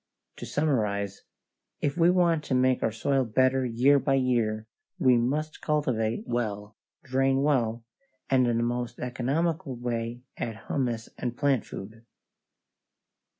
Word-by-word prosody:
To - - -7
summarize: 105 -9 -1 0.5
if 145 0 -1
we 170 0 +4
want 170 -4 +3
to 130 - 0
make 130 0 +3
our 115 - +1
soil 135 +5 +1
better 130 +3 +2
year 130 +5 +4
by 135 0 +1
year, 115 -5 +1 0.3
we 130 -2 +4
must 145 +6 -1
cultivate 120 -7 0
well, 105 -3 -3 0.3
drain 135 +1 +1
well, 120 -5 +1 0.4
and 130 -2 +3
in 120 -1 +1
the 115 - +1
most 120 0 -2
economical 135 +4 -1
way 120 0 -3
add 110 -1 -4
humus 120 -4 -2
and 120 -1 -3
plant 140 -6 +1
food. 110 +4 -9
125 Hz, 135 wpm, -27 LUFS, 115-135 Hz, 0.5 s, we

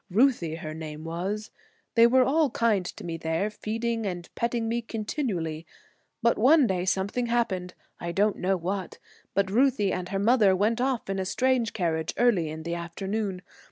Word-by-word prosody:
Ruthie 195 - +2
her 155 -2 -6
name 155 -1 -7
was. 190 +6 -4 0.4
They 230 0 +7
were 255 +2 +5
all 295 +3 +3
kind 215 -6 +1
to - - -8
me 165 -1 -4
there, 165 +6 -1
feeding 225 +1 -2
and 175 -2 -5
petting 235 -1 -1
me 235 +1 0
continually, 205 - -3 0.6
but 235 - +3
one 280 +5 +6
day 185 -4 0
something 200 +6 0
happened, 195 -7 -1 0.2
I 170 - -3
don't 205 +3 +2
know 190 +1 +1
what, 185 +2 -4 0.4
but 195 -1 +1
Ruthie 235 -3 +3
and 180 0 -4
her 195 - -1
mother 205 -2 +4
went 220 +5 +1
off 260 -2 0
in 195 0 -2
a - - 0
strange 255 +2 +1
carriage 160 -4 -1
early 205 -10 +3
in 160 +1 -6
the 170 +1 -3
afternoon. 190 +3 -3
200 Hz, 175 wpm, -27 LUFS, 175-235 Hz, 0.6 s, They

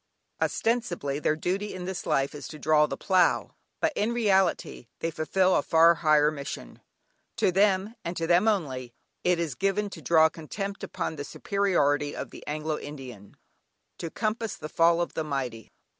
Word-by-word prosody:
Ostensibly, 175 - 0
their 155 - +1
duty 190 +6 -2
in 180 -1 -6
this 185 -1 -5
life 135 0 +1
is 145 - -7
to 155 - -9
draw 150 0 +3
the - - -5
plough, 185 -3 +2 0.3
but 320 -1 +1
in 220 +3 0
reality 195 - +1
they 165 - -2
fulfil 185 +4 +2
a - - +3
far 165 +1 +5
higher 150 -1 +3
mission. 140 -2 -7 0.5
To - - +2
them, 195 +2 +2
and 170 +1 -4
to 165 - -1
them 175 +5 +4
only, 130 - -1 0.3
it 180 -1 +3
is 165 -3 -2
given 195 +1 -1
to - - -9
draw 160 -1 +5
contempt 195 +6 -6
upon 165 -3 -4
the 145 - -4
superiority 145 -6 0
of - - -6
the - - -11
Anglo 155 +1 -2
Indian: 130 -8 -10 0.6
to 165 - -4
compass 220 +3 -2
the 155 - -8
fall 170 +1 +3
of 170 - -3
the 160 - -2
mighty. 130 -7 -4
165 Hz, 175 wpm, -27 LUFS, 150-195 Hz, 0.6 s, far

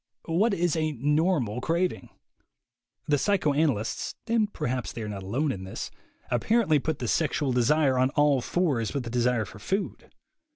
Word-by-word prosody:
What 195 +6 +2
is 175 -2 +1
a 155 -1 0
"normal" 145 - +1
craving? 170 +5 -1 1.0
The 145 -1 +2
psy 205 +5 +2
choanalysts 145 - 0
(and 225 -2 +1
perhaps 125 - -3
they 115 - -6
are - - -4
not 100 -2 -5
alone 130 +10 -1
in 95 -6 -5
this) 95 - -6 0.4
apparently 160 - +3
put 155 +1 -2
the 120 - -4
sexual 145 0 +1
desire 130 +2 +3
on 130 +1 +3
all 145 -3 +4
fours 145 -8 0
with 140 - -1
the 115 - -6
desire 120 -2 +1
for 105 +1 -12
food. 195 - -3
145 Hz, 165 wpm, -27 LUFS, 120-165 Hz, 1.0 s, all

